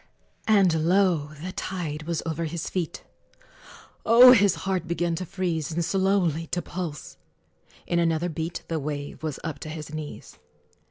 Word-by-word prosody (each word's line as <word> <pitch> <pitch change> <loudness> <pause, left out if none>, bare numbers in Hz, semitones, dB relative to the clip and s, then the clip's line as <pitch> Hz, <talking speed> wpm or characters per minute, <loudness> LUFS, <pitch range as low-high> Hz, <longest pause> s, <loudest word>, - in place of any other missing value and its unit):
And 180 -7 +4
lo! 175 -6 +2
the 185 - -4
tide 160 -5 -4
was 170 -2 -2
over 165 0 -2
his 160 +1 -4
feet; 175 -4 -3 1.0
Oh! 240 +3 +9
his 205 -6 +5
heart 185 -3 -1
began 170 0 0
to 180 +2 -4
freeze, 175 -5 -2
And 165 +1 -1
slowly 190 -5 +1
to 175 - -2
pulse: 170 -5 -6 0.7
in 170 - +1
another 165 0 +1
beat 165 +1 -4
The 165 -1 -2
wave 145 0 -5
was 155 -3 -4
up 160 -2 -4
to 155 - -7
his 155 -1 -7
knees! 155 -1 -8
170 Hz, 155 wpm, -26 LUFS, 155-185 Hz, 1.0 s, Oh